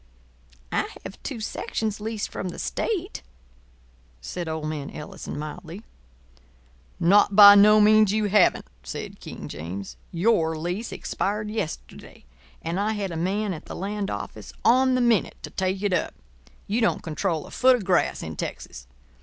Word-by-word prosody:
"I - - 0
have - - -9
two - - -5
sections 215 0 -3
leased 220 -1 -3
from 185 - -4
the - - -8
state," 390 -3 -3 1.0
said 170 - -5
old 160 -1 -3
man 150 -2 -4
Ellison, 150 - -8
mildly. 165 +6 -7 1.2
"Not 200 +3 +4
by 205 0 +11
no 210 +1 +7
means 215 -1 +6
you 215 0 +1
haven't," 205 -1 +3 0.2
said - - -7
King - - -8
James. 90 +6 -7
"Your 170 -3 +2
lease 180 +8 -3
expired 210 +1 -3
yesterday; 185 - -6 0.4
and 170 +3 -2
I 215 +2 0
had 200 -3 -3
a - - -5
man 195 +4 -1
at 155 - -9
the - - -8
land 200 +1 -3
office 100 +1 -6
on 255 +2 +5
the 255 - +2
minute 235 -4 +2
to - - -7
take 190 +1 -2
it 200 -2 +1
up. 180 - -1 0.5
You 220 +4 -1
don't 230 - +1
control 165 0 -2
a - - -13
foot 255 0 +5
of 225 -6 -5
grass 180 -2 +1
in 80 0 -6
Texas. - - -7
195 Hz, 160 wpm, -25 LUFS, 165-215 Hz, 1.2 s, by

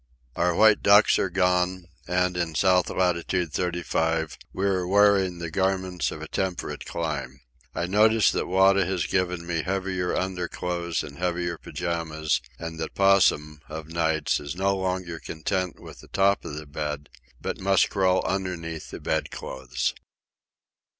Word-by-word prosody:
Our 90 -1 +1
white 110 +1 +5
ducks 100 +2 +6
are 95 - +1
gone, 90 0 +1 0.2
and, 90 0 +1
in 85 -3 -2
south 90 +3 +3
latitude 90 -2 0
thirty 90 -1 -1
five, 80 -1 0 0.2
we 95 - -2
are 95 -2 +1
wearing 100 -2 +4
the 85 -1 -5
garments 95 0 0
of - - -7
a - - -6
temperate 90 -5 -3
clime. 70 -5 -4 0.3
I 85 - -1
notice 105 +3 +4
that - - -2
Wada 95 +1 +4
has 95 -2 -1
given 90 -2 -1
me 85 -2 -1
heavier 95 -1 -1
underclothes 90 -2 -2
and 70 0 -10
heavier 90 -1 -1
pyjamas, 80 -2 -2 0.2
and 80 -1 -6
that 80 - -5
Possum, 95 -6 +3
of 80 0 -7
nights, 80 -1 +1
is 75 +2 -6
no 100 +2 +1
longer 90 -3 -3
content 90 +3 -3
with - - -12
the - - -14
top 100 +1 +2
of 75 - -5
the 75 +1 -7
bed 75 0 -4 0.3
but - - -4
must 95 0 +3
crawl 95 -2 +2
underneath 90 -4 -3
the - - -7
bed 80 -1 -1
clothes. 65 -2 -3
90 Hz, 155 wpm, -26 LUFS, 80-95 Hz, 0.3 s, ducks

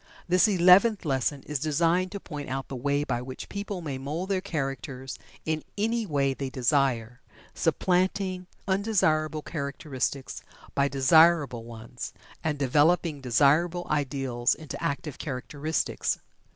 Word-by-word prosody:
This 180 +4 +5
Eleventh 190 +2 +5
Lesson 135 0 0
is 150 -2 -3
designed 165 +5 +1
to 200 - -5
point 150 -7 -7
out 135 +1 -4
the 135 - -5
way 140 +3 0
by 120 -4 -2
which 130 +1 -7
people 200 -2 -4
may 140 -5 -4
mould 155 +8 -4
their 190 -2 +1
characters 135 -6 -4 0.3
in 155 -1 -1 0.2
any 225 +1 0
way 140 -4 +1
they 135 0 -4
desire 125 -2 +1 0.3
supplanting 185 0 0 0.2
undesirable 160 -7 +1
characteristics 140 -2 -3 0.3
by 140 0 +2
desirable 140 -2 +4
ones, 115 +2 -8 0.3
and 155 -2 0
developing 150 +3 +2
desirable 150 +8 +3
ideals 135 -4 0
into 155 -4 -8
active 140 0 -3
characteristics. 145 +3 -2
145 Hz, 125 wpm, -27 LUFS, 135-175 Hz, 0.3 s, This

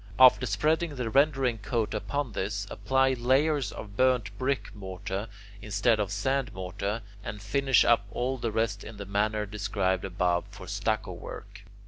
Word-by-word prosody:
After 130 0 +7
spreading 155 +8 +1
the 125 -4 -3
rendering 135 -4 +3
coat 110 +1 -1
upon 135 +4 -2
this, 100 +1 -2
apply 135 0 +2
layers 130 +1 +2
of 100 -2 -9
burnt 125 -5 +2
brick 135 +1 -1
mortar 95 +1 -5 0.3
instead 105 +2 +2
of 100 -2 -1
sand 130 +6 0
mortar, 100 +4 -3 0.2
and 105 0 -5
finish 135 +4 +3
up 110 -4 +4
all 130 +4 -2
the 115 -1 -1
rest 110 -2 -1
in 110 -1 -9
the 100 - -6
manner 105 +2 0
described 100 -2 -1
above 90 -2 0
for 100 -2 -10
stucco 105 0 -1
work. 85 - -9
110 Hz, 155 wpm, -28 LUFS, 100-130 Hz, 0.3 s, After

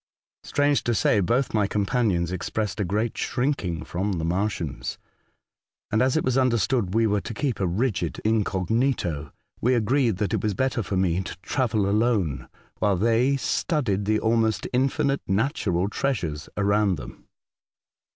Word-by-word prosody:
Strange 145 0 +1
to 120 - 0
say, 105 - +3
both 120 +8 +1
my 105 -2 +2
com 100 0 0
panions 95 -6 +1
expressed 105 +4 -3
a - - +2
great 105 +5 -1
shrinking 115 - -1
from 95 +3 -2
the 80 -3 -2
Martians, 85 - -2 0.9
and 110 - +2
as 130 +3 +2
it - - +1
was 130 +1 +2
understood 115 -5 +1
we 115 0 +4
were 105 -2 +1
to 115 - -7
keep 135 -3 -1
a 95 - +1
rigid 90 -3 -1
incognito, 105 - 0 0.3
we 125 +2 +3
agreed 120 -1 +2
that 105 +2 -1
it 110 - 0
was 105 -2 -1
better 130 +1 0
for 95 -2 -3
me 90 -1 +1
to 90 -2 -7
travel 110 -7 0
alone, 100 - +1 0.3
while 100 -3 +2
they 115 +7 +2
studied 125 - 0
the 110 +1 +2
almost 110 -1 +1
infinite 135 +2 +1
natural 95 - 0
treasures 90 - -2
around 100 -1 +2
them. - - -11
105 Hz, 155 wpm, -25 LUFS, 95-125 Hz, 0.9 s, we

